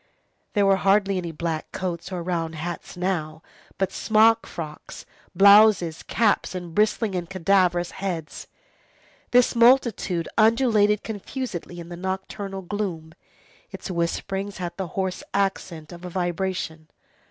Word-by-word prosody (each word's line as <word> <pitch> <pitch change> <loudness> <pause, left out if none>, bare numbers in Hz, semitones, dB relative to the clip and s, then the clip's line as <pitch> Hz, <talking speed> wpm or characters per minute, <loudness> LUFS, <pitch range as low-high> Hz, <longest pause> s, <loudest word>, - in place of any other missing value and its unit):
There 205 -2 +3
were 195 -1 +4
hardly 195 0 +2
any 170 -2 -4
black 160 0 -4
coats 175 -1 -4
or 180 -2 -4
round 165 -2 -2
hats 170 +3 -6
now, 160 -4 -2 0.3
but 195 -1 0
smock 225 +1 +3
frocks, 155 -2 -8 0.3
blouses, 200 -4 +6
caps, 210 -4 +1
and 175 -2 -6
bristling 210 +1 +1
and 175 -2 -3
cadaverous 180 -1 +2
heads. 175 -5 -5 0.8
This 245 -1 +4
multitude 235 -8 +3
undulated 215 -2 +4
confusedly 205 -5 -6
in 170 0 -9
the 175 - -7
nocturnal 190 +1 -5
gloom. 175 -5 -4 0.6
Its 195 - -7
whisperings 195 +3 -2
had 175 -2 -5
the 190 -2 -4
hoarse 190 -1 -1
accent 185 -5 -2
of 175 0 -11
a 180 - -5
vibration. 175 -3 -3
185 Hz, 130 wpm, -24 LUFS, 170-205 Hz, 0.8 s, blouses